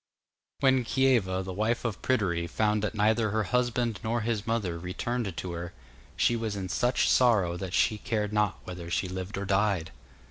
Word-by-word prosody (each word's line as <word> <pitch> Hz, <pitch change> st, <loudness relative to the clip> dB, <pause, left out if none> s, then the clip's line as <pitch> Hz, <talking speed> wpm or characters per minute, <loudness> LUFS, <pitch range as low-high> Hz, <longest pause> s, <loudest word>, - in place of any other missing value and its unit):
When 130 Hz, -2 st, +4 dB
Kieva, 115 Hz, -8 st, +2 dB
the 95 Hz, 0 st, -5 dB
wife 110 Hz, +6 st, -1 dB
of 115 Hz, -3 st, -3 dB
Pryderi, 90 Hz, -9 st, 0 dB
found 105 Hz, +4 st, +1 dB
that 105 Hz, +1 st, -2 dB
neither 110 Hz, +1 st, +2 dB
her 110 Hz, +1 st, 0 dB
husband 120 Hz, -1 st, 0 dB
nor 115 Hz, +1 st, 0 dB
his 110 Hz, -1 st, -2 dB
mother 100 Hz, -7 st, -1 dB
returned 100 Hz, +3 st, -3 dB
to 90 Hz, -, -4 dB
her, 85 Hz, 0 st, -6 dB, 0.4 s
she 120 Hz, -, +3 dB
was 110 Hz, -3 st, -2 dB
in 95 Hz, -2 st, -4 dB
such 125 Hz, +5 st, +1 dB
sorrow 105 Hz, -9 st, +4 dB
that 95 Hz, 0 st, -4 dB
she 110 Hz, -, +2 dB
cared 105 Hz, -2 st, -2 dB
not 105 Hz, -2 st, +1 dB
whether 90 Hz, -2 st, -7 dB
she 90 Hz, +2 st, 0 dB
lived 95 Hz, +2 st, -5 dB
or 100 Hz, -, -3 dB
died. 95 Hz, -4 st, +1 dB
105 Hz, 180 wpm, -28 LUFS, 95-115 Hz, 0.4 s, When